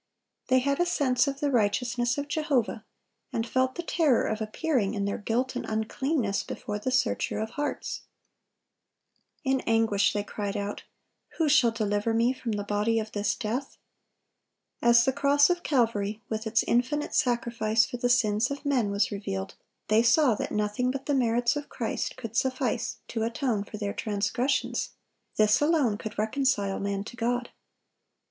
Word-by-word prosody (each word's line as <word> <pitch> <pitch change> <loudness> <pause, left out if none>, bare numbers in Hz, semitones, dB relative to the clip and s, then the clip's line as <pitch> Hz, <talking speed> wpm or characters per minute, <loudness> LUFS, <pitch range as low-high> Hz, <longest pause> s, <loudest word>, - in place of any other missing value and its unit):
They 255 - +4
had 280 +3 +1
a 350 - +3
sense 270 -5 +2
of 275 0 -3
the 290 -1 +1
righteousness 240 +2 +1
of 285 0 -3
Jehovah, 285 -8 0 0.5
and 225 - -1
felt 260 +1 +1
the 345 - -4
terror 310 -7 +2
of 220 0 -2
appearing, 220 -2 0
in 200 -1 -1
their 200 - -2
guilt 240 +5 -1
and - - -2
uncleanness, 220 +1 -1
before 210 0 -5
the 235 - -2
Searcher 255 0 0
of 220 +1 -3
hearts. 290 +2 -3 1.4
In 265 -2 +1
anguish 225 -3 +3
they 205 -1 -1
cried 205 -1 -4
out, 205 0 -4 0.6
"Who 320 - +2
shall 275 -5 +5
deliver 215 0 -1
me 235 +3 +3
from 240 -3 -4
the 205 -1 -2
body 210 +2 0
of 215 -1 -5
this 205 0 0
death?" 250 +4 -4 1.0
As 235 0 +6
the 265 - +2
cross 285 +3 +4
of 350 0 -1
Calvary, 225 -8 0
with 220 0 -3
its 225 +1 +2
infinite 255 +5 0
sacrifice 235 -2 +2
for 245 - -6
the 245 0 0
sins 220 -1 +3
of 280 +1 -6
men, 255 -7 +1
was 200 +1 +1
revealed, 95 - -4 0.3
they 215 +1 +4
saw 250 +2 +4
that - - -4
nothing 210 +4 0
but 270 +1 -4
the 290 - 0
merits 240 -1 +2
of 290 0 -5
Christ 230 -3 -3
could 230 -3 -7
suffice 255 -2 0
to 225 - -3
atone 230 -1 -1
for 210 - -8
their 205 -1 -3
transgressions; 220 +6 -1 0.4
this 215 +3 +4
alone 290 -9 +2
could 220 -2 -7
reconcile 215 -3 0
man 200 0 -2
to 225 - -10
God. 240 +1 -1
235 Hz, 165 wpm, -27 LUFS, 210-265 Hz, 1.4 s, As